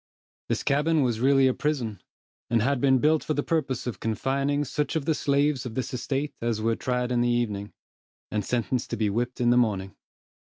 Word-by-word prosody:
This - - -1
cabin 150 +2 +2
was 120 -3 0
really 135 +2 +4
a 130 - +4
prison, 125 - -2 0.5
and 115 - +3
had 135 0 +1
been 135 -1 +5
built 155 +4 +2
for 155 - -1
the 145 - 0
purpose 150 -7 -1
of 115 -7 -4
confining 135 +6 0
such 150 -1 -2
of 155 -3 -1
the 160 - +2
slaves 140 -2 +1
of 120 -3 -6
this 130 - -3
estate 135 +3 -2
as 115 -2 -1
were 115 +1 +1
tried 125 0 -1
in 120 -1 +2
the 120 - +2
evening, 105 -4 -1 0.6
and 105 -1 -1
sentenced 120 +2 -1
to - - -3
be 105 -2 +1
whipped 120 +4 -2
in 120 -1 +3
the 120 - +4
morning. 100 -5 0
125 Hz, 205 wpm, -26 LUFS, 115-140 Hz, 0.6 s, been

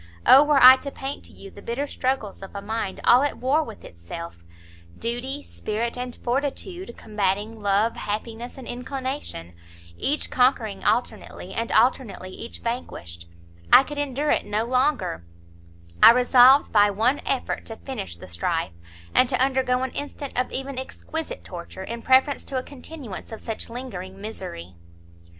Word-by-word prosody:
O 275 - +9
were 295 -1 +3
I 260 +1 +10
to 280 - -6
paint 275 0 -6
to - - -12
you 195 - -12
the 200 - -13
bitter 240 +7 -2
struggles 255 -8 -2
of 195 +1 -10
a 200 - -4
mind 215 -2 -3
all 245 +2 +6
at 290 - -1
war 275 +6 +2
with 225 -7 -10
itself, 85 - -9 0.5
Duty, 255 +5 -3
spirit, 225 +2 -3
and 250 0 -5
fortitude, 285 +5 -3
combating 210 +1 -2
love, 205 +3 +2
happiness 225 +4 -5
and 260 - -9
inclination, 255 - -5 0.5
each 295 +2 0
conquering 245 -5 +2
alternately, 215 -5 -1
and 230 0 -2
alternately 225 -5 +1
each 230 - -8
vanquished, 85 - -5 0.4
I - - +9
could 290 +1 -6
endure 290 +1 -1
it - - +2
no 210 +2 0
longer, 255 - 0 0.8
I - - +11
resolved 250 +3 +6
by 205 -1 +5
one 230 +8 +1
effort 270 - -2
to 225 - -6
finish 220 - -6
the - - -11
strife, 85 -1 -2 0.4
and 255 - +4
to - - 0
undergo 260 -1 +2
an 260 - -2
instant 285 -1 -5
of 250 +1 0
even 270 0 -3
exquisite 315 +4 -6
torture, 180 +1 -8
in 235 +4 -6
preference 265 +3 +3
to 270 - -3
a 255 - -2
continuance 270 -7 -9
of 225 - -7
such 225 0 -5
lingering 195 -6 -7
misery!" 90 - -7
245 Hz, 160 wpm, -24 LUFS, 205-265 Hz, 0.8 s, I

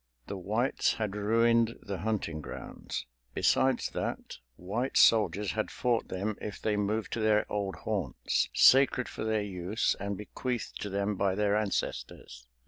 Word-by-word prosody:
The - - -5
Whites 110 +8 0
had 105 -3 -3
ruined 115 +2 +2
the 100 -3 -5
hunting 95 -6 -2
grounds; 70 - -6 0.3
besides 130 0 +2
that, - - -4 0.2
white 110 - -2
soldiers 105 -3 +4
had 110 -1 -2
fought 120 -2 0
them 100 +3 -3
if 105 - -6
they 105 -1 0
moved 105 +2 -1
to - - -2
their 110 -1 +3
old 100 -3 -2
haunts, - - -1
sacred 135 -1 +5
for - - -6
their 110 -1 0
use 95 +2 -1
and 100 0 -3
bequeathed 120 +3 -4
to 105 - -3
them 100 +1 -1
by 95 -1 +1
their 105 0 +2
ancestors. 90 - -3
105 Hz, 150 wpm, -30 LUFS, 100-110 Hz, 0.3 s, sacred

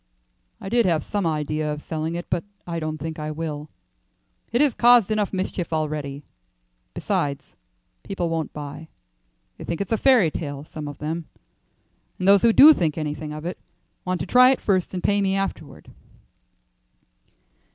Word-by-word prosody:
"I - - -8
did 235 0 +2
have 160 -4 +1
some 205 -4 -2
idea 155 -1 -1
of 150 - -4
selling 160 +2 -4
it, 175 - -5
but 170 - -1 0.2
I 170 -1 -3
don't 155 -1 -3
think 160 +1 -6
I 150 0 -4
will. 155 -1 -5 0.8
It 240 - +1
has 290 -3 +3
caused 240 -3 +5
enough 210 -2 0
mischief 185 -2 -3
already. 150 -3 -3 0.7
Besides, 140 -1 -2 0.5
people 185 -3 -3
won't 165 -1 -2
buy. 150 +2 -8 0.7
They - - -7
think 170 - -4
it's 200 - -4
a 225 - +2
fairy 235 - +4
tale; 145 -3 -5
some 155 -1 -7
of 145 -1 -7
them, 160 +2 -4 0.9
and 185 - -2
those 200 -1 +7
who 235 - +5
do 295 +7 +9
think 165 - -1
anything 150 0 -4
of 155 +1 -7
it 175 - -4 0.4
want 185 -1 -2
to - - -2
try 250 +1 +6
it 265 - +2
first 190 -2 0
and 180 - -4
pay 205 0 +2
me 195 -1 +1
afterward." 195 -6 -5
165 Hz, 170 wpm, -23 LUFS, 155-195 Hz, 0.9 s, do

